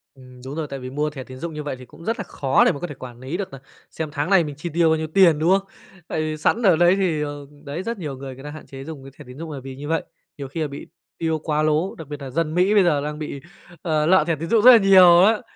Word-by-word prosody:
Ừm, 125 -1 -15
đúng 135 +2 -6
rồi, 160 -2 -3
tại 140 -1 -6
vì 130 0 -7
mua 150 +3 -1
thẻ 140 -3 -8
tín 130 0 -11
dụng 165 +4 -6
như 150 0 -5
vậy 145 -2 -4
thì 130 - -11
cũng 165 - -16
rất 225 +2 -1
là - - -2
khó 135 -7 +1
để - - +4
mà 140 - -6
có 175 - -4
thể 145 - -8
quản 125 -2 -10
lý 135 +7 -5
được 200 -1 -5
nà 135 - -10 0.3
xem 160 -1 -4
tháng 150 +2 -2
này 190 -3 +5
mình 150 -2 -6
chi 160 +4 -6
tiêu 170 0 +3
bao 160 - +3
nhiêu 160 0 -3
tiền, 165 -2 +4
đúng 160 +2 +1
không? 195 0 +2 0.4
Tại 155 - -2
vì 155 0 -3
sẵn 220 +9 +1
ở 190 -7 +5
đấy 175 +3 +4
thì, 180 -6 0
ờ, 145 -1 -5 0.2
đấy, 150 +5 -5
rất 230 +1 -4
nhiều 150 -7 -6
người 135 -1 -8
người 135 - -13
ta 150 - -7
hạn 155 +1 -10
chế 135 0 -10
dùng 150 -2 -9
cái 135 - -11
thẻ 150 - -12
tín 125 +1 -11
dụng 160 +1 -7
nà 140 - -6
vì 135 -1 -8
như 145 +2 -8
vậy, 160 0 0 0.3
nhiều 140 -2 -6
khi 150 +5 -5
là 155 - 0
bị 140 0 -9 0.3
tiêu 160 -1 -1
quá 155 0 -1
lố, 155 +5 0
đặc 160 - -10
biệt 145 0 -6
nà 135 -2 -7
dân 155 +3 -1
Mỹ 185 +4 +3
bây 205 -2 +5
giờ 155 -5 +2
đang 150 +1 -5
bị, 150 -2 -6 0.4
ờ, 155 -3 0
lợ 185 0 +5
thẻ 165 - +1
tín 165 +2 -6
dụng 225 - +4
rất 255 - +10
là 240 - +9
nhiều 185 -4 +7
á. 215 +2 +3
155 Hz, 325 wpm, -22 LUFS, 140-175 Hz, 0.4 s, rất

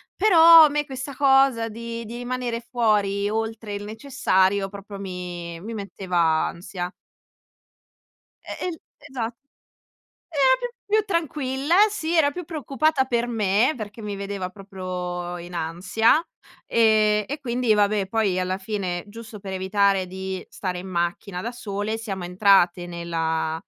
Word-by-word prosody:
Però 335 -5 +8
a 300 - +3
me 295 0 -1
questa 265 0 -6
cosa 270 -4 +4
di 230 +1 -6
di 230 - -8
rimanere 245 -1 -3
fuori 210 -4 +1
oltre 220 -1 -3
il 200 - -5
necessario 200 -5 +1
proprio 200 0 -9
mi 180 -3 -6
mi 225 +4 -6
metteva 195 -3 -4 0.3
ansia. 180 +1 -6 1.5
Eh, - - -5
el 335 -3 -5 0.2
esa 270 -6 -5 1.1
era 265 -2 +5
più - - -3 0.2
più 430 +1 +3
tranquilla, 300 -5 -1 0.2
sì, 340 -5 -2
era 310 -4 +4
più 355 +5 -6
preoccupata 305 -2 0
per 240 -1 0
me, 220 +2 +2
perché 215 -1 -8
mi 205 -1 -4
vedeva 195 -2 -4
proprio 180 -2 -5
in 175 +1 -9
ansia, 185 - +2 0.4
ehm, 215 -2 +3
e 290 +3 -4
quindi 245 -3 +1
vabbè 205 -1 +2
poi 200 -3 +1
alla 185 +1 -1
fine, 190 -3 -3
giusto 220 0 -10
per 195 -1 -7
evitare 195 0 +2
di 190 0 -5
stare 190 -3 -4
in 180 - -7
macchina 175 +2 -2
da 235 +5 -4
sole 210 -1 -3
siamo 195 -5 -5
entrate 180 -1 +3
nella 165 -2 -2
210 Hz, 140 wpm, -24 LUFS, 185-250 Hz, 1.5 s, Però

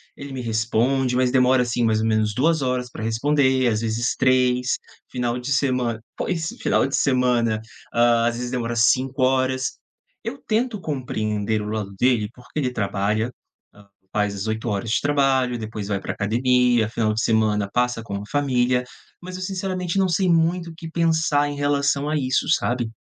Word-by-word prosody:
Ele 140 0 -9
me 130 - -5
responde, 120 +3 0
mas 125 0 +2
demora, 125 -1 +4
assim, 120 0 -1
mais 110 -1 +2
ou 110 - 0
menos 110 -1 +1
2 160 +4 +2
horas 125 -1 -1
para 110 - -7
responder, 130 +2 +2
às 110 -1 +1
vezes 115 +2 -1
3. 125 -1 +2 0.3
Final 125 -1 -1
de 125 +3 -5
semana 125 -4 +1 0.2
pois, 165 -3 -2
final - - +2
de 135 - -1
semana, 125 -4 +2 0.3
hã, 120 0 +4
às 120 - -1
vezes 125 0 -4
demora 120 -2 -2
5 130 +3 +2
horas. 130 0 +1 0.5
Eu - - -4
tento 225 0 0
compreender 110 - -2
o - - -5
lado 105 -2 -4
dele, 120 -5 +2
porque 125 +5 -7
ele 130 -4 0
trabalha, 105 +2 -1 0.4
hã, 100 0 -18 0.3
faz 105 -1 0
as 100 - -4
8 110 +2 -2
horas 105 +2 -2
de - - +2
trabalho, 135 -3 +2
e - - -3
depois 110 -2 -6
vai 100 -1 -1
pra - - -4
academia, 120 +2 +2
final 110 -2 0
de 110 - 0
semana 110 -2 +2
passa 125 -2 0
com 100 -3 -6
a 100 - -4
família. 125 -3 +1 0.4
Mas 185 +1 -7
eu - - -8
sinceramente 185 -1 -3
não 190 -1 +3
sei 180 +2 +1
muito 170 +1 +2
o - - -13
que 165 0 -8
pensar 160 -3 +1
em 145 - -5
relação 145 0 +1
a 155 - 0
isso, 130 -2 0
sabe. 120 -6 +1
125 Hz, 185 wpm, -23 LUFS, 110-140 Hz, 0.5 s, demora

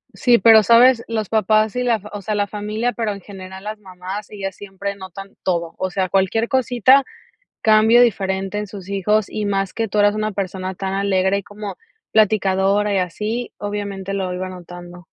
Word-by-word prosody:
Sí, 240 -2 +4
¿pero 225 -2 +7
sabes? 235 +3 +5
Los 220 -2 -2
papás 215 0 +2
y 250 - 0
la 245 -2 +2
f 210 -1 -8
o 205 - -5
sea, 210 +2 -2
la 205 0 +1
familia, 215 +4 -3
pero 220 -2 -2
en 200 - -10
general 190 -1 -10
las 215 0 -6
mamás, 190 +1 -8
ellas 195 -2 -6
siempre 200 0 -6
notan 195 0 -10
todo, 170 -3 -1
o 185 - -1
sea, 185 +1 -1
cualquier 195 +5 +1
cosita 260 +1 +4 0.6
cambio 220 +2 +6
diferente 195 -3 0
en 210 - -3
sus 195 -1 -10
hijos, 205 +2 +1
y 210 -1 -3
más 195 -1 -1
que 225 -1 -2
tú 210 - -2
eras 205 0 +4
una 215 0 -2
persona 190 -1 -4
tan 190 +1 -4
alegre, 195 0 +1
y 200 - -6
como 205 +1 -8 0.4
platicadora 205 -1 +2
y 195 - +2
así, 215 +7 -3
obviamente 200 -2 -5
lo 190 -2 -2
iba 185 +1 -4
notando. 175 -1 -11
200 Hz, 190 wpm, -20 LUFS, 190-215 Hz, 0.6 s, pero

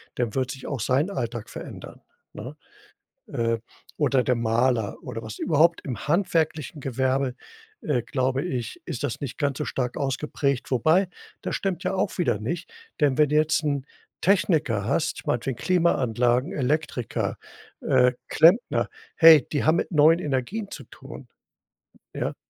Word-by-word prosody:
dann 120 -3 -2
wird 130 -1 0
sich 135 -2 -8
auch 140 -5 -3
sein 135 - +1
Alltag 120 - -4
verändern, - - -9 0.3
ne? 130 +8 -8 0.7
Äh, 115 0 0 0.4
oder 140 -4 +2
der 125 - +1
Maler 115 -1 +1
oder 115 - -6
was 110 -1 -8
überhaupt, 165 +1 +3
im 130 +1 -5
handwerklichen 160 -3 0
Gewerbe, 130 0 0 0.5
äh, 130 -5 0
glaube 130 +3 -1
ich, 130 - -4
ist 140 - -5
das 130 - -3
nicht 140 -4 -6
ganz 140 -3 0
so - - -2
stark 125 -2 -3
ausgeprägt. 140 -1 -1
Wobei, 160 +9 +3 0.3
das - - -4
stimmt 185 -3 -2
ja 185 +1 0
auch 190 +1 -1
wieder 170 - +1
nicht, 165 - -4 0.3
denn 145 -3 +3
wenn 150 -2 +3
du 150 - +2
jetzt 155 +1 +2
'n 140 -3 -1 0.4
Techniker 160 - +2
hast, 165 +9 -1
meinetwegen 120 +1 -1
Klimaanlagen, 125 - +1
Elektriker, 145 - -1 0.4
äh, 125 0 +3 0.2
Klempner, 175 +10 +4 0.3
hey, 160 -5 +8
die 145 - -1
haben 160 +2 +4
mit 175 - -2
neuen 155 +2 +6
Energien 175 - -3
zu 135 - -8
tun. 135 +2 -12 0.9
Ja. - - -2
140 Hz, 150 wpm, -25 LUFS, 125-160 Hz, 0.9 s, hey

